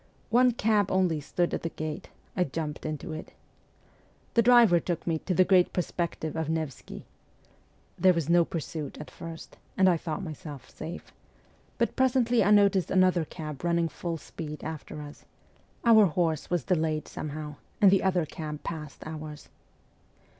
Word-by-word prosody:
One 250 +2 +5
cab 215 -3 +2
only 180 -5 +2
stood 175 +4 -1
at - - -1
the 165 - -2
gate; 155 -1 -6 0.3
I 180 - +3
jumped 155 -1 -4
into 155 0 -5
it. 155 - -8 1.0
The 235 - +5
driver 230 -7 +6
took 170 -1 -3
me 165 -2 0
to 185 - -2
the 185 - +5
great 185 -2 +4
Perspective 170 -3 -2
of 160 -1 -2
Nevsky. 160 -5 -4 0.9
There 185 +1 +6
was 165 -4 -1
no 170 +1 +5
pursuit 160 -2 -5
at 150 - -9
first, 165 -1 -9 0.2
and 190 - +5
I 175 -2 +4
thought 160 +4 -4
myself 150 -4 -8
safe; 170 +3 -8 0.7
but - - 0
presently 245 -3 +3
I 200 - +2
noticed 200 -3 +4
another 185 -3 +3
cab 155 -3 -7
running 170 -1 +1
full 165 +3 -4
speed 150 -1 -8
after 155 -1 -6
us; 145 0 -12 0.6
our 220 -3 +7
horse 165 -2 -1
was 175 -5 0
delayed 155 -2 0
somehow, 150 -1 -6 0.2
and 200 -3 +7
the 195 - +4
other 180 -3 +1
cab 150 -1 -7
passed 150 -3 -6
ours. 155 -1 -8
165 Hz, 160 wpm, -28 LUFS, 155-185 Hz, 1.0 s, our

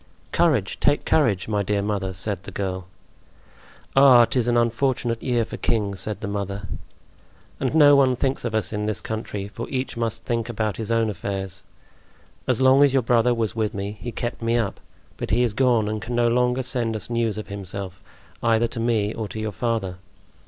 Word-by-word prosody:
"Courage, 135 - +1
take 145 0 +2
courage, 115 - +2
my 105 -2 0
dear 100 0 0
mother!" 100 -2 -2
said 95 0 -3
the - - -9
girl. 95 -2 -4 1.1
"Ah! 130 -3 +8
'tis 120 +1 0
an 120 0 +3
unfortunate 120 0 0
year 120 -3 +1
for 110 - -7
kings," 100 -4 -1
said 105 +2 -4
the 100 - -3
mother. 100 0 -4 0.9
"And 135 +3 -1
no 145 -2 +7
one 130 -2 +4
thinks 135 +2 -1
of 115 -2 -2
us 110 -2 -1
in 105 0 -2
this 110 -3 -1
country, 105 -3 -4
for 115 +3 -7
each 130 -1 -3
must 115 -2 -3
think 115 -1 -1
about 110 -3 -2
his 110 -1 -4
own 115 -1 +2
affairs. 95 0 -5 0.8
As 125 -3 +1
long 130 +2 +6
as 140 -2 +4
your 135 -2 +3
brother 120 +1 +3
was 110 -2 -1
with 110 -3 -1
me 100 +1 -3
he 120 - -4
kept 120 +2 -4
me 115 +1 +1
up; 110 -4 -2 0.4
but - - -4
he 120 +3 +3
is 120 -4 0
gone 120 -3 +2
and 105 0 -3
can 120 +1 -4
no 120 0 +3
longer 125 +2 +2
send 120 -3 -1
us 110 - -5
news 115 -3 0
of 110 - -6
himself, 100 -1 -6 0.4
either 115 0 +3
to 120 - -5
me 115 -2 +1
or 110 -2 -4
to 105 +3 -7
your 110 0 -2
father. 105 -5 -2
115 Hz, 200 wpm, -23 LUFS, 100-120 Hz, 1.1 s, Ah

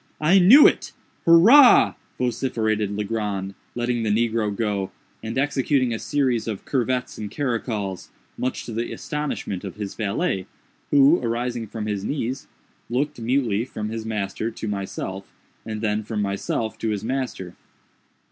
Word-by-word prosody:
—I 170 +6 +5
knew 235 +12 +9
it! - - +2 0.3
hurrah!" 230 +12 +8 0.2
vociferated 110 -4 0
Legrand, 105 -2 -3 0.2
letting 120 0 -1
the 110 - -1
negro 110 0 +1
go, 100 -2 -2 0.3
and 110 +3 -5
executing 135 -2 +1
a 110 - -3
series 130 -6 0
of 105 -4 -5
curvets 125 -2 -1
and 105 -1 -5
caracols, 110 -7 -3 0.3
much 130 - -3
to - - -7
the 115 +2 -3
astonishment 150 -10 -4
of 95 -3 -6
his 105 -2 -5
valet, 100 -3 -2 0.4
who, 145 +4 +5
arising 120 -1 -2
from 105 +1 -5
his 105 -2 -3
knees, 130 +1 -3 0.4
looked, 140 +3 -1
mutely, 115 -3 +1
from 110 -4 -5
his 115 0 -4
master 110 0 -3
to 110 -1 -7
myself, 95 -1 -5 0.4
and 110 -1 -4
then 105 -1 0
from 110 0 -4
myself 100 +2 -2
to 110 - -1
his 105 -1 -2
master. 120 -7 -3
115 Hz, 145 wpm, -23 LUFS, 105-130 Hz, 0.4 s, knew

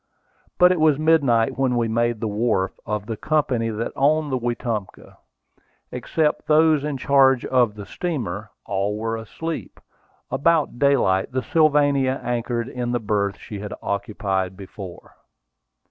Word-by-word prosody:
But 180 0 +6
it 180 - +1
was 155 -3 +4
midnight 145 -8 +2
when 130 -2 +2
we 115 -1 +1
made 115 0 0
the 115 - -1
wharf 105 -3 0 0.2
of 105 -1 -2
the 115 0 -4
company 130 -4 0
that 110 +1 -3
owned 150 +1 +2
the 130 - 0
Wetumpka. 120 -4 -4 0.8
Except 155 -2 -1
those 155 -1 +4
in 150 -2 -2
charge 135 -1 +4
of 120 -5 +2
the 105 -1 -8
steamer, 110 - -4 0.2
all 100 +1 -1
were 115 +1 -2
asleep. 160 +9 -6 0.5
About 150 -2 +1
daylight, 135 -10 +2
the 130 -1 -1
Sylvania 145 -3 +2
anchored 120 0 -2
in 120 -1 -3
the 120 - +1
berth 105 -2 -1
she 105 - -8
had 105 0 -6
occupied 95 -2 -2
before. 95 -2 -10
120 Hz, 145 wpm, -22 LUFS, 105-145 Hz, 0.8 s, But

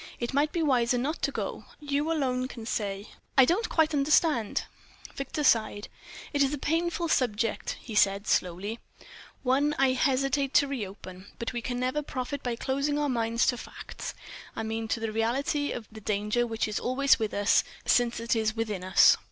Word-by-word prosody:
It 240 +2 -3
might 290 +2 +2
be 335 - 0
wiser 250 -4 +2
not 285 +7 -2
to - - +1
go. - - -4
You 290 +1 -1
alone 255 -5 0
can 230 -4 -9
say." 200 -2 -3 0.3
"I 265 - +9
don't 405 - +1
quite 320 -1 +2
understand 290 -5 +2 0.3
..." - - -17
Victor 285 +3 -3
sighed. 215 -5 +2 0.4
"It 285 - +1
is 275 -1 +3
a 295 - -2
painful 335 +4 0
subject," 230 -7 0
he 230 - -9
said, 200 0 +3
slowly—"one 235 - -2
I 270 -1 +4
hesitate 275 +1 +1
to 285 - +5
reopen. 195 -7 -7
But 235 +1 -4
we 240 - -3
can 245 +1 -3
never 255 +4 0
profit 275 0 -4
by 245 -2 -2
closing 275 +4 -1
our 295 -1 0
minds 230 -1 +1
to 245 - +1
facts; - - -8 0.4
I - - -3
mean, 225 0 -3
to 225 - -1
the 225 -1 -2
reality 265 +6 0
of 230 - -5
the 220 0 -10
danger 210 +4 0
which 225 -1 -1
is 215 - -2
always 265 +2 +3
with 220 -2 -1
us, 205 +1 +4 0.2
since 240 -1 +2
it 230 +1 0
is 220 0 0
within 215 -5 -3
us." 185 -1 +6
245 Hz, 185 wpm, -28 LUFS, 220-280 Hz, 0.4 s, I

